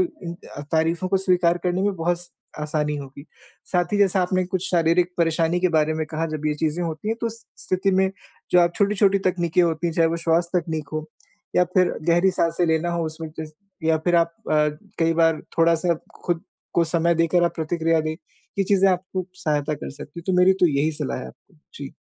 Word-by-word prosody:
उम, 315 - -3 0.2
अ, - - -5
तारीफों 165 +3 +1
को 195 - +2
स्वीकार 180 -2 +2
करने 180 +2 0
में 200 -1 +1
बहुत 175 +1 0
स 175 - -12 0.3
आसानी 150 0 -1
होगी। 140 0 -9 0.5
साथ 180 +3 +1
ही 205 - +2
जैसा 195 -1 +3
आपने 185 +1 +1
कुछ 185 -1 -2
शारीरिक 175 +1 +3
परेशानी 165 +1 +1
के 180 - +3
बारे 155 0 +3
में 160 0 -1
कहा 160 +1 -2
जब 155 0 -3
ये 150 - +1
चीज़ें 160 +3 -1
होती 165 +5 -4
हैं 225 - 0
तो 235 - 0
उस 230 0 -5 0.2
स्थिति 185 +2 0
में 190 0 +2 0.4
जो 180 - +6
आप 170 0 +3
छोटी-छोटी 200 -1 +3
तकनीकें 180 -2 +1
होती 165 0 0
हैं, 165 - -2
चाहे 165 -1 +3
वो 165 - -1
श्वास 170 +1 +1
तकनीक 160 -4 -2
हो 155 0 -3 0.5
या 180 - +5
फिर 185 -1 +4 0.2
गहरी 175 +3 +4
साँसें 170 -1 +1
लेना 160 +2 +1
हो 170 -1 -1
उसमें 155 0 -6 0.6
या 160 0 +3
फिर 175 +2 +1
आप 165 0 +2 0.2
अ, 150 0 +4 0.3
कई 165 0 +2
बार 165 -1 +3 0.2
थोड़ा 165 0 +5
सा 170 +1 +1 0.3
खुद 175 0 -1 0.3
को 170 - +4
समय 170 +1 +1
देकर 165 +1 +2
आप 170 - 0
प्रतिक्रिया 165 0 +1
दें। 155 0 -2 0.5
ये 195 - +3
चीज़ें 195 0 +4
आपको 185 0 -2
सहायता 150 -3 -1
कर - - -7
सकती 145 +4 -9
है, - - -16
तो 190 - +1
मेरी 180 +1 +6
तो 180 - +6
यही 145 +2 +1
सलाह 145 -3 -3
है - - -7
आपको। 185 - -20 0.2
जी। 140 -1 -8
170 Hz, 215 wpm, -23 LUFS, 160-180 Hz, 0.6 s, जो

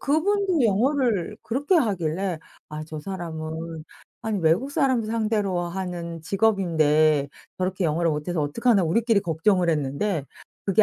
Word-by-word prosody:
그분도 370 +3 +1
영어를 225 - +1
그렇게 285 - 0
하길래 190 - 0 0.3
'아 155 0 -6
저 155 -1 -7
사람은 160 -2 -6 0.4
아니 220 -2 -1
외국 170 - +2
사람들 260 -6 +1
상대로 210 -5 0
하는 175 -2 -5
직업인데 155 -7 +2 0.3
저렇게 185 0 -1
영어를 165 +1 +1
못해서 155 +2 -2
어떡하나.' 205 - +2
우리끼리 225 +5 +2
걱정을 175 +1 +1
했는데 150 +3 -1 0.4
그게 195 +2 +4
185 Hz, 320 characters per minute, -24 LUFS, 160-225 Hz, 0.4 s, 그게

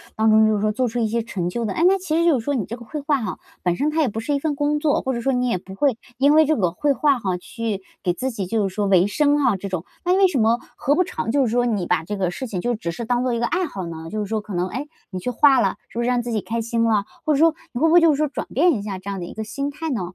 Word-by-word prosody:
当 220 0 +3
中， 220 0 +6
就 215 - +2
是 - - -1
说 215 +1 +1
做 250 +3 0
出 240 +2 -3
一 225 - +1
些 230 +2 0
成 190 -6 -3
就 235 +5 -3
的。 200 - -2
哎， 330 - 0
那 390 +1 +4
其 330 -3 -1
实 335 - +2
就 315 -7 +4
是 225 - -7
说 285 +2 -1
你 220 - -1
这 230 - -6
个 235 - -11
绘 295 +6 -6
画 285 -2 0
哈， 215 -4 -4 0.2
本 175 -1 +1
身 295 +9 0
它 320 - +1
也 295 - +2
不 220 - -4
是 260 +6 -2
一 280 - +1
份 295 0 -1
工 295 +1 0
作， 300 -2 +1
或 265 - -2
者 235 - -3
说 270 +2 +1
你 250 0 +1
也 230 - +1
不 190 +1 -11
会， 260 0 +1 0.2
因 280 +2 +4
为 315 0 +6
这 310 +1 +2
个 180 -6 +1
绘 280 +11 +1
画 280 -2 +2
哈， 185 -5 -1
去 215 +1 -4 0.2
给 180 - +1
自 260 +7 -3
己 200 -5 -4
就 210 -1 0
是 185 - -8
说 205 -1 0
维 185 -1 +5
生 290 +6 +2
啊 255 -8 +2
这 195 +1 -6
种。 185 -2 -3 0.2
那 360 +1 +2
为 390 - +6
什 315 -8 -1
么 230 +2 +3 0.2
何 285 - +1
不 365 - +3
尝 225 - -4
就 275 -1 +3
是 225 - -1
说 245 +1 +2
你 205 -6 -1
把 180 - +1
这 205 +4 -4
个 185 -2 0
事 260 +7 -5
情 195 -5 -4
就 240 +5 0
只 170 -6 -4
是 230 +7 -6
当 245 +1 +1
做 255 - 0
一 - - -2
个 235 - +1
爱 365 +9 0
好 190 -8 -6
呢？ 165 -1 -7
就 215 - -4
是 210 - -1
说 215 +1 -2
可 205 -3 -7
能， 180 +1 0
哎， 265 +9 -5 0.2
你 185 - -4
去 250 - -3
画 270 +2 +5
了， - - +1
是 235 - -6
不 - - +1
是 - - -1
让 245 -1 +2
自 240 - -4
己 215 -3 0
开 230 +1 -3
心 230 0 0
了？ 215 -3 +2 0.2
或 310 - +2
者 275 - +2
说， 325 +1 +5 0.2
你 240 - -4
会 325 - +4
不 325 - +3
会 350 - +7
就 330 - +6
是 280 - 0
说 305 - +1
转 280 - -5
变 335 +4 +4
一 210 - -2
下 200 -2 -5
这 195 +2 -8
样 195 - -4
的 175 - -5
一 - - -9
个 220 - -4
心 275 +6 -3
态 320 +3 -5
呢？ 235 - -1
235 Hz, 380 characters per minute, -22 LUFS, 205-285 Hz, 0.2 s, 会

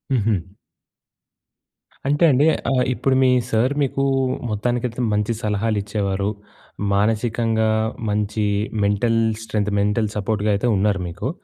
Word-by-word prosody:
ఉహూ. 110 -2 +2 1.7
అంటే 145 +4 +2
అండి 135 +4 +3 0.3
ఆహ్, 125 -1 +2
ఇప్పుడు 135 +1 0
మీ 130 - +4 0.2
సర్ 120 +5 +2
మీకు 135 0 -1 0.5
మొత్తానికైతే 120 +3 -2
మంచి 105 +2 0
సలహాలు 105 +1 0
ఇచ్చేవారు. 100 -1 -1 0.6
మానసికంగా 110 +1 +1 0.4
మంచి 105 +1 -1 0.4
మెంటల్ 115 +3 +2 0.2
స్ట్రెంత్, 105 -2 -1
మెంటల్ 105 +1 +1
సపోర్ట్‌గా 105 0 -1
అయితే 100 - -1
ఉన్నారు 100 -1 +1
మీకు. 85 +9 -4
110 Hz, 110 wpm, -21 LUFS, 105-120 Hz, 1.7 s, మీ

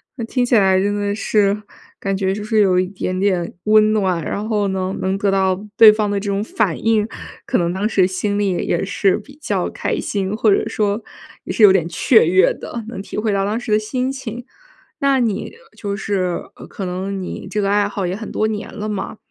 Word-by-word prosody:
那 235 -4 -4
听 245 +2 0
起 240 - +2
来 190 -3 +4
真 205 +1 0
的 205 0 -1
是， 205 -1 +1 0.4
感 195 0 -1
觉 190 0 0
就 205 +1 -5
是 215 0 +1
有 185 -2 +4
一 185 - +2
点 185 -1 -4
点 185 -3 0
温 215 0 +5
暖， 185 -6 0
然 205 +6 -3
后 210 -2 0
呢， 190 0 -2
能 190 +1 0
得 200 0 0
到 190 -1 +1 0.2
对 220 -2 +10
方 210 -1 -1
的 200 0 0
这 200 +1 -4
种 200 +1 0
反 215 -6 -1
应， 220 -1 +2 0.4
可 - - +1
能 170 0 0
当 200 +3 0
时 190 -4 +3
心 200 +2 -2
里 200 -2 +1
也 175 - -1
也 175 - 0
是 195 -1 +1
比 280 +1 -13
较 - - -1
开 - - -2
心， 195 0 -2
或 220 -1 +3
者 - - 0
说 210 +1 -1 0.4
也 - - -4
是 225 - +2
有 205 - +9
点 175 -4 +2
雀 220 +6 +4
跃 185 +2 +4
的， 235 - -7
能 225 -4 -6
体 - - -8
会 215 0 0
到 195 0 +1
当 215 +3 -1
时 240 -2 -5
的 210 - +4
心 250 +5 -2
情。 245 -3 -7 0.5
那 275 -1 +3
你， 225 -5 -1 0.3
就 200 -1 -3
是， 185 -3 -1
呃， - - -11
可 195 - -6
能 190 +2 -3
你 185 - -6
这 210 +1 -1
个 195 - 0
爱 205 0 +2
好 200 -2 -3
也 180 - -2
很 215 +1 -7
多 215 - 0
年 215 -1 -5
了 215 -1 -5
嘛， 210 0 -4
205 Hz, 250 characters per minute, -19 LUFS, 190-215 Hz, 0.5 s, 对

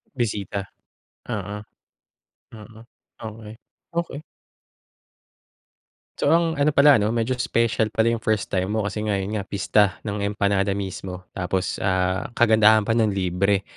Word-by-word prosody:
Bisita? 100 -5 -2 0.7
Oo, 105 +1 -4 1.0
oo. 110 0 -13 0.4
Okey, 110 -1 -8 0.4
okey. 170 -4 -3 2.0
So, - - +1
ang 165 -3 +1
ano 145 +1 +2
pala 140 -4 +7
'no 105 +3 0
medyo 115 +2 0
special 115 -2 +1
pala 115 +1 +3
'yong 115 - -1
first 110 -2 -1
time 95 0 0
mo, 110 - 0
kasi 105 +1 -3
nga 105 - +1
'yon 100 +2 -2
nga 100 - -7
pista 100 0 +2
ng 105 -1 -3
empanada 100 -1 0
mismo 95 -2 -6
tapos, 90 0 -2
ah, 95 -1 0
kagandahan 110 -2 +5
pa 115 - -1
no'n, 115 -1 +3
libre. 95 +1 0
105 Hz, 135 wpm, -23 LUFS, 100-115 Hz, 2.0 s, pala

